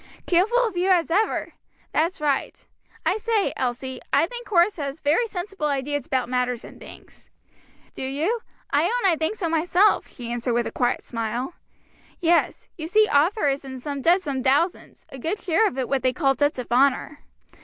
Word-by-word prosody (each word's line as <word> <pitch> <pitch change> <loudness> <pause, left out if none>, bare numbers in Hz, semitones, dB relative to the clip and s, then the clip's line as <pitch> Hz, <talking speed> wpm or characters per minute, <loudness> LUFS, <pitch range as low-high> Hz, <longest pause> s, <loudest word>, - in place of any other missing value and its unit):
"Careful 375 +7 +3
of 420 - -7
you 360 +2 +1
as 345 -3 +3
ever! 420 +6 0 0.4
that's 335 +4 0
right. 290 -3 -1 0.4
I 385 - +2
say, 440 -2 0
Elsie, 255 0 -3
I - - +4
think 480 +6 -8
Horace 365 +1 +3
has 280 0 -4
very 315 +12 +2
sensible 385 -5 -4
ideas 285 -1 -2
about 260 -2 0
matters 250 -1 -1
and - - -12
things." - - -14 0.6
"Do - - -8
you? 300 - -1 0.3
I - - +4
own 480 -6 +2
I - - +2
think 320 +6 -1
so 380 -5 -2
myself," 350 +5 +3
she 235 -1 -8
answered 240 0 -1
with 235 0 +1
a - - -4
quiet 245 -1 0
smile. 235 +5 -3 0.7
"Yes; 340 -1 +1
you 315 - -4
see 430 +5 +4
Arthur 320 +6 +3
is 275 0 0
in 260 -1 -7 0.2
debt 350 +6 +4
some 275 -5 -2
thousands, 285 +7 0
a 270 - -9
good 340 - -2
share 385 +4 +2
of 260 - -5
it 260 -2 -1
what 270 0 0
they 255 -1 +1
call 270 -3 +2
debts 290 +3 0
of 250 -2 -6
honor. 275 +3 +2
300 Hz, 185 wpm, -24 LUFS, 260-365 Hz, 0.7 s, I